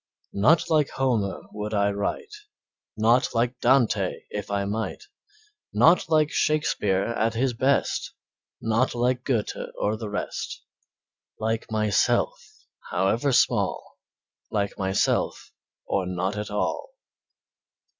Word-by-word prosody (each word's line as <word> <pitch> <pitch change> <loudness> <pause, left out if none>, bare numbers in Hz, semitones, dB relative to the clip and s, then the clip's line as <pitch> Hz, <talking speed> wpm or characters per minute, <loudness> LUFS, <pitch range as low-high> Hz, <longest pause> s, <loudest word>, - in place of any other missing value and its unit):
Not 125 +12 +4
like 155 -4 +2
Homer 120 -7 -1
would 105 +1 -4
I 100 0 +2
write, 100 - -3 0.6
Not 115 +3 +3
like 120 +2 0
Dante 115 -7 +2
if 105 -1 -5
I 100 -1 -1
might, 110 +3 -3 0.7
Not 165 0 +4
like 155 -1 +3
Shakespeare 125 - +1
at 115 0 -1
his 125 +2 +1
best, 130 +4 +1 0.5
Not 115 +3 +1
like 125 +1 +1
Goethe 120 -6 -1 0.2
or 105 +1 0
the 110 -2 -5
rest, 105 - -4 0.8
Like 110 +1 -2
myself, 110 - 0 0.2
however 100 +9 +1
small, - - +1 0.5
Like 100 -1 -1
myself, 95 0 0 0.3
or 95 -2 -1
not 90 +2 -2
at 105 0 -4
all. 105 - -2
110 Hz, 115 wpm, -25 LUFS, 100-130 Hz, 0.8 s, Not